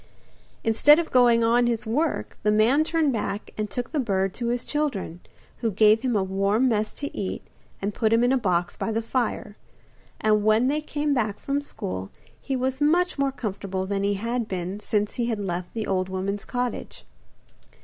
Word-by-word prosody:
Instead 255 +7 +6
of 335 -1 -2
going 240 -2 +5
on 240 +1 +3
his 235 -2 -1
work, 290 +8 -1
the 210 - +1
man 225 +8 +4
turned 315 -3 +1
back 210 -2 -3
and 215 -1 -3
took 245 +3 -4
the 310 - 0
bird 195 -6 0
to 240 - -4
his 240 +1 -1
children, 265 - -2 0.4
who 230 - -1
gave 215 +2 +4
him 250 -3 0
a 200 - +2
warm 195 +6 +1
mess 215 -3 0
to 285 - -6
eat 195 - -4 0.4
and 205 +1 -1
put 220 0 +1
him 230 +1 +4
in 245 - +3
a 265 - +4
box 180 -5 0
by - - -2
the 225 +1 -1
fire, 225 -3 -2 0.6
and 215 -1 +2
when 215 +4 +4
they 300 +2 0
came 295 -1 -1
back 220 -6 0
from 280 +1 -2
school 95 - -6 0.3
he 270 - -2
was 260 +2 -1
much 340 +2 +2
more 275 -1 +2
comfortable 195 -6 -4
than 195 0 -2
he 200 0 +1
had 230 +3 -2
been 185 0 -4
since 210 0 -1
he 235 - 0
had 225 -2 -1
left 180 -3 -4
the 220 -2 -2
old 185 -1 -1
woman's 195 +2 -3
cottage. 245 -1 -4
225 Hz, 195 wpm, -25 LUFS, 200-255 Hz, 0.6 s, Instead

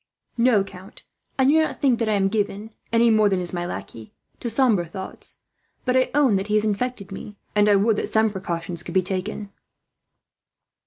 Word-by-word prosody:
"No, 230 -4 +4
count, 190 -1 -13 0.3
I 265 - +3
do 300 +4 +5
not 315 - -2
think 260 -5 +2
that 230 -2 0
I - - +2
am 195 -1 +2
given, 210 +1 -2 0.2
any 230 0 +4
more 215 -1 +4
than 190 -2 +1
is 175 0 -2
my 175 0 -2
lackey, 110 -9 -8 0.2
to 240 - -3
sombre 230 -6 +3
thoughts; 190 +3 -8 0.5
but 255 - +1
I 260 0 +3
own 270 -9 +4
that 195 +1 -3
he 210 - 0
has 215 0 +3
infected 210 -1 -2
me, 205 +1 -8 0.2
and 210 0 +4
I 205 - +6
would 205 +2 +2
that - - -2
some 220 0 +2
precautions 170 -3 -4
could - - -8
be 185 - +4
taken." 195 +2 -4
210 Hz, 200 wpm, -23 LUFS, 190-230 Hz, 0.5 s, I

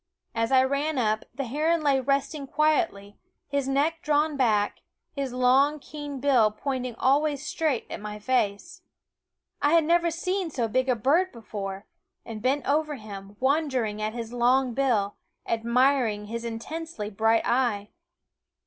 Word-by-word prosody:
As 230 +1 -1
I 260 -1 +6
ran 280 +3 -1
up, 215 -3 0
the 275 +3 -4
heron 310 +6 0
lay 280 -2 +3
resting 275 +2 -1
quietly, 305 - 0 0.3
his 280 -2 -1
neck 295 +5 +1
drawn 300 0 +1
back, 215 -6 +1 0.3
his 275 -2 -2
long 260 +4 +3
keen 290 -1 -7
bill 255 -5 +4
pointing 255 +2 -4
always 285 +3 +1
straight 305 -8 -1
at - - -7
my 210 0 -6
face. 250 - -1 0.8
I 290 +2 +3
had 335 -1 +5
never 340 +2 +3
seen 365 +2 -2
so 245 -6 -1
big 255 +4 0
a 250 - +3
bird 305 - +2
before, 200 -3 -6 0.4
and 220 -2 -7
bent 265 +4 0
over 300 +1 +1
him, 205 -3 -10
wondering 260 -6 0
at 215 +1 -2
his 230 0 -6
long 250 +1 +2
bill, 230 -6 +1 0.3
admiring 235 -1 +2
his 230 +2 -5
intensely 235 0 -5
bright 225 +2 +2
eye. 235 -5 +1
260 Hz, 150 wpm, -26 LUFS, 225-295 Hz, 0.8 s, I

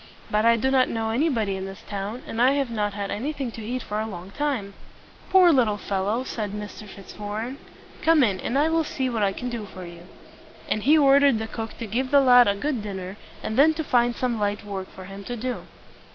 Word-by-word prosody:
But 215 +1 +2
I 230 0 +6
do 265 +4 0
not 260 -1 +4
know 225 -1 -2
anybody 230 -6 +1
in 190 0 -4
this 195 0 -10
town, 205 +4 -5
and 225 - -3
I 260 +2 +5
have 275 -4 -1
not 210 -2 -1
had 200 -1 -3
anything 265 +4 -3
to 225 - -8
eat 245 +3 -3
for 210 0 -3
a 220 - -2
long 185 -2 -8
time." 255 -7 -2 0.6
"Poor 370 -2 +7
little 230 -6 +2
fellow!" 205 +4 -1
said 210 -5 -4
Mr. 210 0 -7
Fitz 195 0 -12
war 205 0 -4
ren. 255 +5 -6 0.4
"Come 320 -3 +5
in, 195 -6 +1
and 245 - -2
I 295 +2 +3
will 325 0 +2
see 265 -4 -2
what 225 -2 -1
I 200 -1 +3
can 250 +5 -5
do 230 -3 -4
for 185 -1 -9
you." 170 0 -12 0.6
And 215 - 0
he 300 +8 +5
ordered 280 -3 +5
the 220 - -3
cook 225 0 -6
to 230 - -5
give 245 +5 -2
the 285 - +6
lad 245 -3 +7
a 200 - +2
good 255 +2 -2
dinner, 190 -2 -6 0.3
and 220 - -3
then 315 +3 +6
to 320 - -2
find 240 -3 +2
some 245 -3 -1
light 205 0 -1
work 195 -2 -5
for 185 - -11
him 195 +1 -9
to 245 - -4
do. 250 +2 -4
225 Hz, 240 wpm, -25 LUFS, 205-260 Hz, 0.6 s, Poor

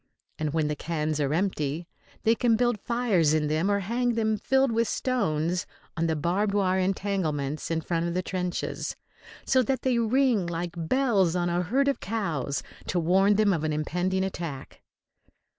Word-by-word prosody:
And 155 -1 -1
when 155 -1 +1
the 150 - -1
cans 155 -1 -2
are 140 -1 0
empty 165 -2 -1 0.4
they 225 - +5
can 230 -1 +2
build 240 -1 +1
fires 205 -10 +2
in 155 -1 +1
them 155 +6 +1
or 200 0 +1
hang 240 +4 0
them, 220 -1 +1
filled 265 +4 +2
with 230 0 +1
stones, 170 - 0 0.3
on 165 0 0
the 160 - +1
barbed 185 +7 0
wire 190 -2 +2
entanglements 180 -7 -1
in 165 -1 0
front 170 0 -1
of 170 - -3
the 185 - 0
trenches, 180 -2 -3 0.5
so 260 - +4
that 260 +2 -1
they 250 -3 +2
ring 235 -4 +2
like 170 0 -3
bells 190 -1 +2
on 175 -1 0
a 175 +1 +1
herd 260 +10 +1
of 280 - +1
cows 160 - -2 0.2
to 180 - 0
warn 190 +5 +4
them 210 -1 +3
of 160 -3 -2
an 155 - 0
impending 180 +5 -1
attack. 165 -8 -6
185 Hz, 175 wpm, -27 LUFS, 160-220 Hz, 0.5 s, they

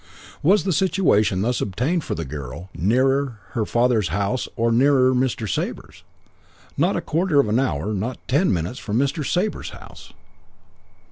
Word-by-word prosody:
"Was 195 +7 +4
the 190 - 0
situation 145 - +2
thus 125 +2 0
obtained 130 - -1
for - - -3
the 80 - -4
girl 75 +6 -8
nearer 130 +4 +1
her 110 -4 -2
father's 120 -5 +2
house 100 +9 -1
or 115 0 +1
nearer 130 +1 +4
Mr. 125 -3 0
Sabre's? 90 - -4 0.7
'Not 170 +7 +1
a 170 - -1
quarter 165 -1 +1
of 140 - +3
an 110 +4 +2
hour, 105 - -1
not 110 +6 -3
ten 150 +8 +2
minutes, 90 +7 -2
from 105 +1 -2
Mr. 140 +3 0
Sabre's 185 +9 -1
house.' - - -13
125 Hz, 155 wpm, -22 LUFS, 100-145 Hz, 0.7 s, Was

